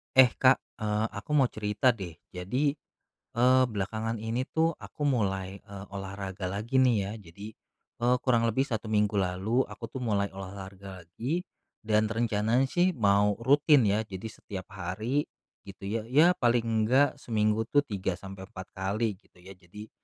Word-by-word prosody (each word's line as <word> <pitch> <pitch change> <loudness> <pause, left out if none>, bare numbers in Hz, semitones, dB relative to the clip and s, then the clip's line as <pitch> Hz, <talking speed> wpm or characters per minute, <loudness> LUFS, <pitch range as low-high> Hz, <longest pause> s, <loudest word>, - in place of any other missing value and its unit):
Eh, 130 -1 +8
Kak, 130 0 +5 0.2
eee, 105 0 0
aku 100 +9 -6
mau 135 -4 +4
cerita 105 +4 +1
deh 95 -8 -3 0.2
jadi, 125 +11 -1 0.6
eee, 130 +2 +5
belakangan 110 +1 -3
ini 115 +3 -2
tuh 160 +2 0
aku - - -12
mulai, 100 -9 0
eee, 100 0 -10
olahraga 95 -1 -6
lagi 105 +8 -2
nih 130 -2 +5
ya - - -5
jadi, 100 +2 -11 0.5
eee, 120 +1 +3
kurang 120 -3 +2
lebih 115 +3 +1
1 120 -5 -2
minggu 105 -1 +1
lalu 95 +7 +1
aku 115 - -9
tuh - - -7
mulai 100 -3 +1
olahraga 95 0 -9
lagi 120 - -3 0.4
dan 110 0 +2
rencananya 115 +3 +1
sih 180 +4 +2
mau 105 -4 +3
rutin 145 +3 +5
ya 105 +2 +1
jadi 100 +1 -7
setiap 95 -3 -9
hari 110 +11 -2 0.4
gitu 100 0 -8
ya. 110 +1 -2
Ya 155 +9 +4
paling 115 -4 +2
nggak 135 +6 +3
seminggu 110 -3 0
tuh 145 +5 +3
3 100 -8 -3
sampai 95 +1 -9
4 95 -1 -9
kali 100 +2 -1
gitu 90 -2 -25
ya. 95 +1 -12
Jadi, 100 +4 -12
110 Hz, 160 wpm, -29 LUFS, 100-125 Hz, 0.6 s, Eh